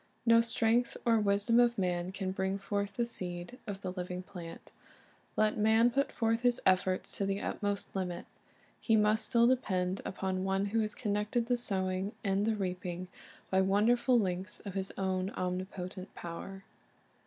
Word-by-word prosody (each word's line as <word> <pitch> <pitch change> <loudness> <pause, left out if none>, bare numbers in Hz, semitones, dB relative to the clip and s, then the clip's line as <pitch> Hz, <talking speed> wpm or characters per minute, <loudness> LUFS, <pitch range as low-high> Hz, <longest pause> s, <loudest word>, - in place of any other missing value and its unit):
No 230 0 +7
strength 230 +1 +1
or 230 -2 +4
wisdom 205 +3 +3
of 240 -1 +4
man 180 -1 -1
can 190 -1 -3
bring 190 +1 -1
forth 200 0 -2
from 235 +4 -1
the - - 0
seed 180 0 -5
the 195 -2 -4
living 180 0 -5
plant. 175 -3 -10 0.7
Let 215 0 +2
man 220 +3 +5
put 275 +3 +1
lorth 225 -1 +2
his 245 0 +3
efforts 185 0 +2
to 200 - 0
the 195 0 -1
utmost 205 -1 -3
limit, 180 -2 -3 0.5
he 225 - +2
must 215 +1 +3
still 235 -2 +5
depend 190 -7 +1
upon 190 -1 -2
One 195 +1 +1
who 225 - +3
has 215 -1 0
conn_ected 210 +2 0
the 245 +1 +2
sowing 190 -3 -1
and 200 +1 +1
the 225 - +2
reaping 180 -2 -4 0.4
by 190 0 +4
wonderful 230 +6 +3
links 190 -2 -1
of 200 - -7
His 190 0 -2
own 190 -1 0
omnipotent 185 +1 -4
power. 195 +3 -7
200 Hz, 165 wpm, -32 LUFS, 185-225 Hz, 0.7 s, No